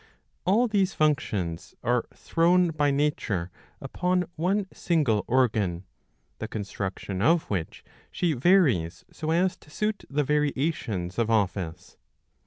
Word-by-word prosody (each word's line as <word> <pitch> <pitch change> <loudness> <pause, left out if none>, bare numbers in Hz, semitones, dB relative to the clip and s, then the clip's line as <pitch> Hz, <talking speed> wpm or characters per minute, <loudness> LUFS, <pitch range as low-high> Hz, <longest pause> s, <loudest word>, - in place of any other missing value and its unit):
All 220 +7 +4
these 195 -4 +1
functions 105 - -1
are 120 0 +1
thrown 175 +2 +2
by 145 -2 +1
nature 140 -11 -1 0.3
upon 180 0 0
one 190 +5 0
single 140 - +1
organ, 110 -9 +1 0.6
the - - -4
construction 95 -2 -4
of 160 +8 +4
which 90 -5 -3 0.3
she 175 -3 0
varies 130 - +2
so 155 - -5
as 180 +3 +2
to - - -20
suit 210 +6 -2
the 145 +1 +1
variations 140 - -1
of 115 -1 +1
office. 95 -5 -1
145 Hz, 120 wpm, -26 LUFS, -, 0.6 s, All